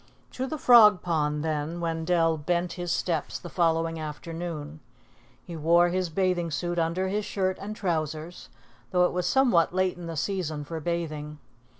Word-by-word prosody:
To 260 +1 -3
the 310 - -4
Frog 220 -8 +7
Pond, 150 -3 0
then, 155 +1 -2
Wendell 165 0 +1
bent 170 +3 -1
his 175 -1 -4
steps 165 -4 -1
the 175 - -10
following 165 -1 +1
afternoon. 155 0 -6 0.7
He 170 - -7
wore 170 +3 +4
his 180 0 -1
bathing 180 -1 0
suit 175 +3 -2
under 170 +3 0
his 205 +2 -1
shirt 190 -2 -1
and 210 +2 -5
trousers, 160 -3 -3 0.4
though 180 -1 +3
it - - -1
was 180 0 -1
somewhat 190 -11 +3
late 185 -1 +1
in 175 -1 -8
the 165 -1 -5
season 160 -4 -2
for 160 +3 -5
bathing. 155 -2 -4
170 Hz, 165 wpm, -27 LUFS, 160-180 Hz, 0.7 s, Frog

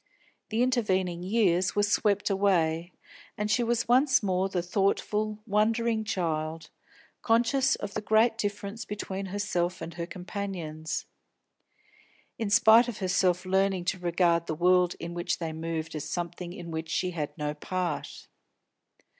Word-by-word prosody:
The 225 +3 +1
intervening 190 -9 0
years 185 -2 +2
were 205 - +3
swept 205 0 +1
away, 175 -4 +1 0.5
and 210 0 -1
she 245 - +3
was 235 0 0
once 260 +1 +4
more 190 0 +1
the 180 -2 -1
thoughtful, 210 +3 0
wondering 220 +1 +1
child, 160 -5 -2 0.5
conscious 240 +4 +3
of 205 0 -6
the 215 - -2
great 220 +2 +3
difference 205 0 -4
between 195 -1 -5
herself 185 -3 -1
and 170 - -7
her 170 -1 -5
companions; 180 -4 -5 1.3
in 220 -3 -1
spite 220 +3 +6
of 240 - -5
herself 185 -1 +1
learning 190 -1 +1
to 185 - -12
regard 170 -1 +1
the 155 - -2
world 180 +1 +3
in 170 +1 -6
which 175 0 -1
they 165 -2 -4
moved 160 0 -4
as 150 -1 -5
something 175 0 -4
in 175 -1 -8
which 160 0 -4
she 180 +2 0
had 155 -3 -4
no 150 -1 -2
part. 175 +1 -4
185 Hz, 145 wpm, -28 LUFS, 170-210 Hz, 1.3 s, spite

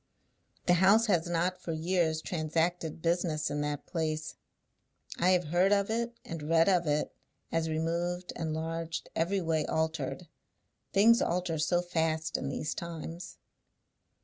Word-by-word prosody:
"The 175 - +5
house 210 +4 +6
has 175 -5 +1
not, 180 +2 0
for 165 - -3
years, 160 -1 0
transacted 165 0 -1
business 165 -3 0
in 145 0 -1
that 145 -1 -3
place. 155 -2 -2 0.9
I 180 - +4
have 180 -4 +2
heard 180 +4 +3
of 200 +1 +2
it, 235 +1 -2
and 165 -2 -6
read 165 0 +5
of 180 -4 +3
it, 150 0 0 0.4
as 165 -1 0
removed, 170 +3 -2
enlarged, 165 +1 -3
every 185 +4 +1
way 160 -2 +1
altered. 160 +1 -2 0.6
Things 230 +4 +5
alter 175 -2 0
so 175 +3 +2
fast 160 -2 -1
in 135 - -1
these 145 +2 -2
times." 170 0 -7
165 Hz, 140 wpm, -30 LUFS, 160-180 Hz, 0.9 s, house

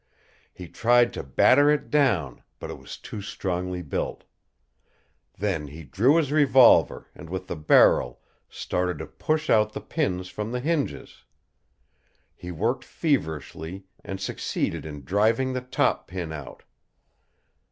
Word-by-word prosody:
He 90 - -10
tried 120 +5 +3
to - - -4
batter 145 - +4
it 150 -1 0
down, 100 - +1 0.2
but - - -7
it - - -9
was - - -10
too 105 - -8
strongly 90 -2 -4
built. 70 - -4 1.1
Then 90 -6 -2
he 80 +3 -10
drew 110 - +2
his 155 -4 +1
revolver 135 -5 +5
and 80 - -12
with 95 +1 -5
the - - -5
barrel 75 -5 +4 0.3
started 90 -2 -2
to 80 - -6
push 155 0 -2
out 110 -1 +3
the - - -4
pins 90 0 -2
from 105 +4 -5
the 125 - -2
hinges. 150 +2 -3 1.1
He 90 - -9
worked 115 +10 -1
feverishly 90 - -3 0.2
and 95 -1 -6
succeeded 95 - -3
in 75 -2 -8
driving 110 - +1
the 130 - -2
top 125 - 0
pin 90 -3 -5
out. 75 -4 -9
95 Hz, 140 wpm, -25 LUFS, 80-125 Hz, 1.1 s, revolver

